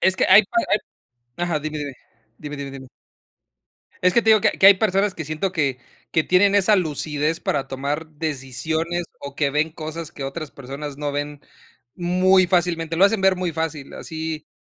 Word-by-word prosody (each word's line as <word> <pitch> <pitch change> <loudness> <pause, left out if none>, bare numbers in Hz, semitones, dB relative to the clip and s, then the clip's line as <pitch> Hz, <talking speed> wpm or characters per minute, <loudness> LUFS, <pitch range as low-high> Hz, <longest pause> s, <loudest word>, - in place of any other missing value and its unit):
Es 185 0 +3
que - - +2
hay 215 - +9
para 345 - -1
hay 210 - +4 0.6
ajá, 175 -3 -1
dime, 155 0 -4
dime, 145 -2 -4 0.5
dime, 150 -1 -7
dime, 140 -1 -6
dime. 135 -1 -10 1.2
Es 180 0 +3
que 235 - +4
te 225 - +1
digo 215 - +7
que - - +3
que 195 - +7
hay 200 - +10
personas 195 0 +1
que 160 - -6
siento 155 +5 -2
que 140 -7 -1 0.3
que 160 - +2
tienen 195 +2 +4
esa 205 +2 +4
lucidez 155 -2 -1
para 140 -2 -1
tomar 140 +4 -3
decisiones, 160 +3 -3 0.2
o 140 0 -8
que 145 -2 +1
ven 150 +3 0
cosas 155 +1 -7
que 140 - -8
otras 140 +2 -5
personas 140 +2 -7
no 145 -1 -2
ven 145 0 -4 0.5
muy 185 +1 +3
fácilmente. 170 -2 0
Lo 195 - +7
hacen 200 0 +1
ver 190 -1 +4
muy 180 -1 -2
fácil 160 -3 -4
así, 160 -2 -6
160 Hz, 190 wpm, -22 LUFS, 145-185 Hz, 1.2 s, hay